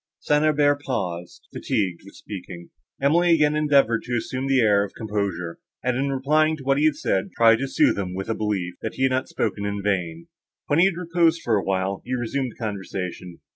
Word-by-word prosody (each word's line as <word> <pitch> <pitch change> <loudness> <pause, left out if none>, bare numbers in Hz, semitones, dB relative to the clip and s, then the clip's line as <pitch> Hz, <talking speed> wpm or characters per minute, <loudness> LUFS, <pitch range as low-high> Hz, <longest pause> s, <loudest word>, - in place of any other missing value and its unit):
St. 150 0 +2
Aubert 145 -2 +3
paused, 90 -11 -4
fatigued 95 -5 -2
with 100 - -14
speaking. 90 -3 -9 0.3
Emily 165 +5 +4
again 150 -1 +2
endeavoured 140 -6 +3
to 120 -1 -1
assume 130 +3 -3
an 135 - +1
air 105 -3 +4
of 100 - -8
composure; 100 -6 -3 0.2
and, 125 0 0
in 135 +2 0
replying 155 +4 +2
to 140 - -11
what 135 +1 +2
he 150 - +3
had 155 -2 +3
said, 95 - -1
tried 115 -1 +6
to 135 - -2
sooth 115 - +2
him 90 -2 -4
with 95 +1 -4
a 115 - 0
belief, 100 -5 -2
that 110 - -4
he 130 - -2
had 130 - +3
not 130 0 -1
spoken 100 - -2
in 100 -1 -3
vain. 85 -5 -2 0.4
When 145 - +1
he 175 - +6
had 190 -3 +1
reposed 170 -1 +1
a - - 0
while, 95 0 -1
he 125 +1 -3
resumed 125 +1 -2
the - - -10
conversation. 95 -4 -5
115 Hz, 210 wpm, -23 LUFS, 95-145 Hz, 0.4 s, tried